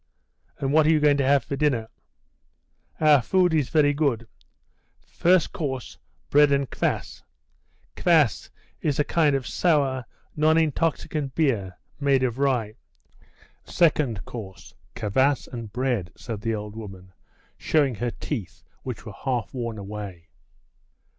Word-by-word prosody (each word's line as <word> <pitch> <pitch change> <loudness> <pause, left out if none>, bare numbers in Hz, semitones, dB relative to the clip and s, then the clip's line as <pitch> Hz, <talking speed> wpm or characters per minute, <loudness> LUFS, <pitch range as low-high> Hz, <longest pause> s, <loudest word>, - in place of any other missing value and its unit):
"And 135 0 -2
what 155 0 +5
are - - +4
you 160 -1 +4
going 145 -1 +4
to 135 -2 +1
have 140 -2 +4
for 140 - -4
dinner?" 135 -6 0 1.1
"Our 150 -3 +5
food 180 +6 +2
is 150 -5 +1
very 145 -2 +3
good. 135 -7 0 0.8
First 180 -1 +2
course, 135 -5 -4 0.3
bread 145 0 +6
and 140 -1 +2
kvas; - - -3 0.7
[kvas 155 - +2 0.3
is 145 -2 0
a 150 - +3
kind 150 -1 +2
of 135 -2 -2
sour, 140 -7 +1 0.3
non 155 +1 +3
intoxicant 155 -3 -1
beer 110 - 0 0.2
made 140 -2 +2
of 125 0 -1
rye] 125 -6 +1 0.9
second 150 - +1
course, 95 -6 -9 0.2
kvas 130 +7 +1
and 115 -3 -6
bread," 120 -7 -1
said 110 -4 -6
the 115 +1 -1
old 105 0 -7
woman, 95 -4 -10 0.4
showing 145 -5 +1
her 120 +3 -2
teeth, 100 - -6 0.2
which 125 -4 -7
were 110 - -8
half 125 +1 -3
worn 115 -3 -4
away. 100 -4 -8
135 Hz, 135 wpm, -25 LUFS, 110-150 Hz, 1.1 s, bread